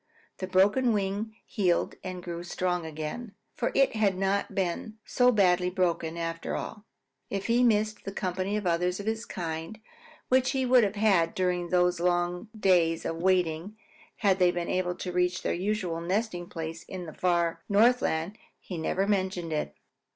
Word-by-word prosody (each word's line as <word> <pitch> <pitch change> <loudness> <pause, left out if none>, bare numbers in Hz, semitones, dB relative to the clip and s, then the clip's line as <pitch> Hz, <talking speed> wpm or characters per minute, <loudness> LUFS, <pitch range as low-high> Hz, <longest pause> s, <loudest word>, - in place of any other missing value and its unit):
The 185 - -3
broken 205 +7 +3
wing 205 +2 -2
healed 180 -5 +1
and 185 -1 -6
grew 170 -1 -5
strong 180 -1 -2
again, 160 +9 -6 0.2
for 245 - -1
it 275 -4 +3
had 200 -4 +2
not 195 +1 0
been 195 +3 -2
so 250 0 +4
badly 180 -4 +3
broken, 170 -3 -1
after 165 0 -3
all. 210 0 -6 0.4
If 195 -1 -3
he 235 +2 +3
missed 215 -2 +2
the 195 - -5
company 190 +1 -2
of 210 - -4
others 180 +2 +1
of 200 - -6
his 220 +1 -2
kind 165 +3 -5 0.5
which 255 +1 +3
he 265 -1 +1
would 250 -1 +6
have 205 0 0
had 195 -6 +3
during 180 -2 0
these 180 0 +2
long 175 +3 0
days 170 -4 +3
of 165 - -2
waiting 180 +2 0 0.4
had 195 -3 +2
they 180 -1 +5
been 175 -1 -2
able 180 -1 0
to 180 - -5
reach 180 +1 0
their - - 0
usual 185 -3 -2
nesting 180 -1 -2
place 165 0 -5
in 185 -2 -7
the 155 - -8
far 170 -2 +1
Northland, 205 -4 +2 0.2
he 180 -3 -6
never 190 +4 0
mentioned 185 -5 -1
it. 150 - -2
185 Hz, 170 wpm, -28 LUFS, 175-210 Hz, 0.5 s, would